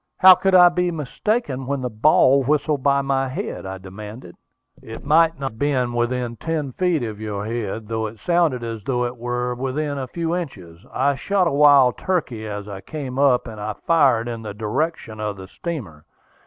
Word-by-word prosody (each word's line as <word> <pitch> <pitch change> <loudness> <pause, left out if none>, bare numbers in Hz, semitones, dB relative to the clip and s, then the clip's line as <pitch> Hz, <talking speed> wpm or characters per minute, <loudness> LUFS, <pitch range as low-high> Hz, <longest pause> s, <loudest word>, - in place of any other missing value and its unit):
"How 185 0 +9
could 185 +1 +1
I 180 -1 +8
be 180 0 0
mistaken 150 - -2
when 140 -1 -2
the 125 - -2
ball 135 +3 +4
whistled 145 +1 0
by 140 0 +2
my 135 -1 0
head?" 185 - -5
I 95 0 -5
demanded. 95 +1 -10 0.5
"It 115 - -10
might 165 +1 +3
not 135 -1 -3
have 110 - -17
been 130 -4 0
within 120 0 -1
ten 155 -4 -3
feet 175 -1 0
of 110 -2 -6
your 105 -2 -4
head, 110 -1 -4
though 110 0 -2
it 110 +1 -10
sounded 165 -5 +1
as 115 -2 -5
though 125 +1 0
it 120 +1 -4
were 125 +1 -2
within 140 +3 -3
a 130 - -4
few 165 +4 -2
inches. 95 - -7
I 140 +2 +1
shot 190 +7 0
a 170 - +1
wild 140 -3 +5
turkey 125 -12 -2
as 105 -1 -6
I 100 -2 -7
came 135 -2 -6
up, 135 -4 +3
and 110 -2 -8
I 105 +1 -3
fired 135 -8 +3
in 115 -1 -5
the 105 -2 -7
direction 115 +1 -3
of 105 -2 -3
the 95 0 -9
steamer. 100 - -7
130 Hz, 195 wpm, -22 LUFS, 110-150 Hz, 0.5 s, How